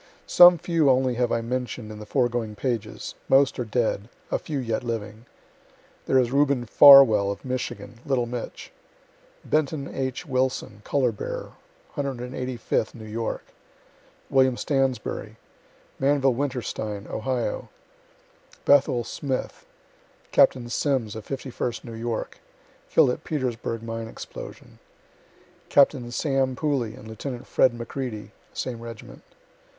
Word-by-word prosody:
Some 175 0 +8
few 165 -3 +2
only 130 -1 +3
have 120 0 0
I 115 - +1
mention'd 125 -2 -4
in 105 - -9
the 105 - -9
foregoing 120 -2 0
pages 120 -3 -3 0.2
most 135 0 +4
are - - 0
dead 110 -2 -1 0.2
a - - +1
few 150 - -4
yet 115 -2 -2
living. 110 -1 -5 0.8
There 130 - +3
is 125 -2 +2
Reuben 140 -3 +2
Farwell, 120 -6 +8
of 100 +4 -5
Michigan, 125 -1 -5
(little 130 -3 0
"Mitch;") 120 0 -7 0.7
Benton 150 -2 0
H. 130 +4 -4
Wilson, 130 -6 -1
color 130 -1 +1
bearer, 105 - -6 0.5
185th 125 -4 -2
New 110 -2 -10
York; 115 +1 -4 0.9
Wm. 130 -1 +4
Stansberry; 135 -3 -1 0.6
Manvill 135 -1 +3
Winterstein, 115 -6 -3
Ohio; 125 +1 -3 1.0
Bethuel 130 -4 +4
Smith; 130 +2 -4 0.6
Capt. - - +5
Simms, 130 -8 0
of 110 -1 -8
51st 130 -3 -4
New 115 - -8
York, 115 0 -4 0.5
(kill'd - - +5
at - - -5
Petersburgh 120 -6 -3
mine 115 0 -5
explosion,) - - -10 0.9
Capt. 140 +1 +6 0.2
Sam. 135 0 0
Pooley 130 -7 -1
and 110 - -12
Lieut. 120 +3 -6
Fred. 130 - +3
McReady, 120 -2 -5 0.2
same 120 -3 -5
reg't. 115 -2 -10
125 Hz, 120 wpm, -25 LUFS, 115-135 Hz, 1.0 s, Some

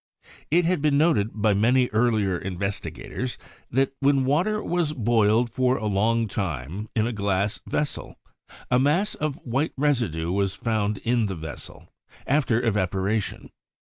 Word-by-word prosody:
It 170 +3 +3
had 175 -3 +1
been 145 -1 +3
noted 145 -10 +3
by 105 -1 +2
many 125 +5 +3
earlier 110 -4 +2
investigators, 100 +7 -4 0.3
that 135 +2 +1
when 140 -1 +3
water 185 +10 +1
was 170 -3 0
boiled 115 -2 +2
for 130 +1 +2
a 110 - -4
long 110 +3 +1
time 95 - -4
in 110 -1 +2
a 120 - -2
glass 100 -1 0
vessel, 150 -1 -3 0.6
a 125 - +4
mass 160 +10 +2
of 150 -2 -2
white 135 +5 -1
residue 115 - 0
was 100 0 0
found 105 -3 -1
in 115 -2 +1
the 95 - -4
vessel 80 -2 -9 0.4
after 135 -5 +2
evapo 100 -6 0
ration. 105 +1 -2
115 Hz, 150 wpm, -25 LUFS, 100-135 Hz, 0.6 s, a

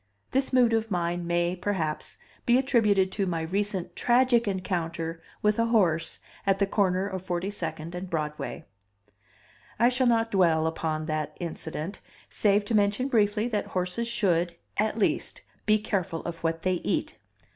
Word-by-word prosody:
This 265 0 +1
mood 245 -3 +4
of 225 0 +1
mine 175 -2 -1
may, 175 +1 +1
perhaps, 175 -5 -2 0.3
be 240 +1 +6
attributed 215 -8 +3
to 195 0 -1
my 170 -2 -1
recent 195 +2 -2
tragic 240 -1 +3
encounter 170 -4 -2 0.2
with 210 +1 +3
a 230 - +3
horse 175 -8 +2 0.3
at 195 -1 +2
the 200 - +3
corner 190 -2 +1
of 190 -2 -4
42nd 175 -3 -3
and 180 +1 -5
Broadway. 150 -4 -3 1.1
I 240 +1 +5
shall 255 0 +1
not 230 -1 +2
dwell 165 -5 +3
upon 160 -1 -2
that 155 -1 -3
incident, 165 +1 -5 0.3
save 205 0 +3
to 225 - -2
mention 210 +5 +2
briefly 215 -2 +2
that 210 -3 -1
horses 180 +6 -1
should, 175 -7 +1 0.2
at 215 +1 0
least, 230 - 0 0.3
be 215 0 +5
careful 185 -6 -2
of 170 -1 -5
what 165 0 -2
they 185 -2 +1
eat. - - -1
190 Hz, 155 wpm, -27 LUFS, 170-215 Hz, 1.1 s, be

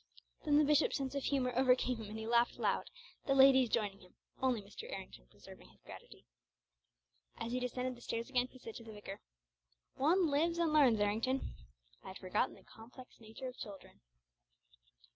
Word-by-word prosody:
Then 295 -1 +4
the 305 - +6
bishop's 300 +1 +3
sense 270 -2 -3
of 280 -1 -3
humour 255 -3 0
overcame 255 -1 +3
him 220 -2 -8
and 215 - -6
he 220 - -5
laughed 235 +1 +2
loud, - - 0 0.4
the 275 - +3
ladies 265 -2 +7
joining 205 -3 -1
him, 180 -2 -19 0.3
only 255 -3 +2
Mr. 200 0 -10
Errington - - -8
preserving - - -15
his - - -25
gravity. - - -13 1.1
As 230 - -4
he 250 - 0
descended 250 +1 -3
the 240 - -16
stairs 230 0 -3
again, 250 -2 +1
he 255 - -16
said 230 -3 -9
to 230 - -10
the 225 -1 -10
vicar, 205 -1 -8 0.7
"One 325 +3 +2
lives 330 +4 +1
and 335 -3 +1
learns, 265 -8 +5
Errington. 225 +6 0 0.5
I - - -12
had 190 - -7
forgotten 185 +2 -1
the - - -18
complex 245 +3 -14
natures 245 +3 -8
of - - -11
children." 200 -5 -10
250 Hz, 180 wpm, -35 LUFS, 220-270 Hz, 1.1 s, ladies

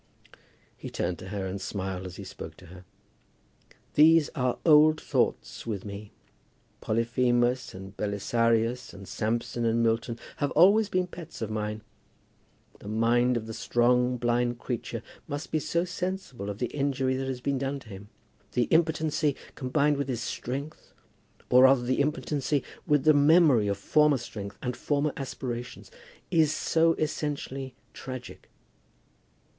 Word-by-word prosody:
He - - -8
turned 90 - -2
to 95 - -9
her, 100 0 -4
and 95 +1 -4
smiled 95 -2 -4
as 90 - -9
he - - -8
spoke - - -9
to - - -14
her. 90 0 -13 1.1
"These 160 0 +6
are 125 -5 0
old 155 0 +6
thoughts - - -1
with 105 -4 -3
me. 100 +1 -8 0.7
Polyphemus 120 +2 +1
and 95 +1 -9
Belisarius, 115 +3 0
and 95 -1 -11
Samson 115 +2 -2
and 115 0 +2
Milton, 115 +1 0 0.2
have 145 - 0
always 200 +6 +5
been 185 -1 +1
pets 175 -2 -10
of 110 - -4
mine. 105 0 -3 1.0
The - - -11
mind 120 +3 +2
of 110 - -4
the 110 - -6
strong 125 +2 +2
blind 120 0 0
creature 120 -1 -4 0.2
must 145 +2 -5
be 155 - +1
so 170 +3 0
sensible 180 - -4
of 100 - -5
the 125 +1 -3
injury 135 -2 0
that 135 0 -3
has 130 -2 -3
been 135 +1 -1
done 135 +1 -2
to 110 - -15
him! 100 0 -10 0.4
The 125 - +2
impotency, 155 -3 +2 0.2
combined 140 +3 +1
with 140 -1 -2
his 120 -2 -2
strength, 140 +5 -5 0.6
or 125 - +7
rather 130 -2 +5
the 130 +3 +1
impotency 145 -2 -1 0.2
with 150 -3 +3
the 155 +1 +6
memory 145 -6 +5
of 100 -1 0
former 150 +7 +3
strength 105 -4 -7
and 125 -1 -2
former 145 +2 0
aspirations, 125 -2 -6 0.4
is 160 -3 +4
so 165 +1 +2
essentially 140 -4 -3 0.2
tragic!" 130 -1 -8
125 Hz, 150 wpm, -28 LUFS, 115-150 Hz, 1.1 s, or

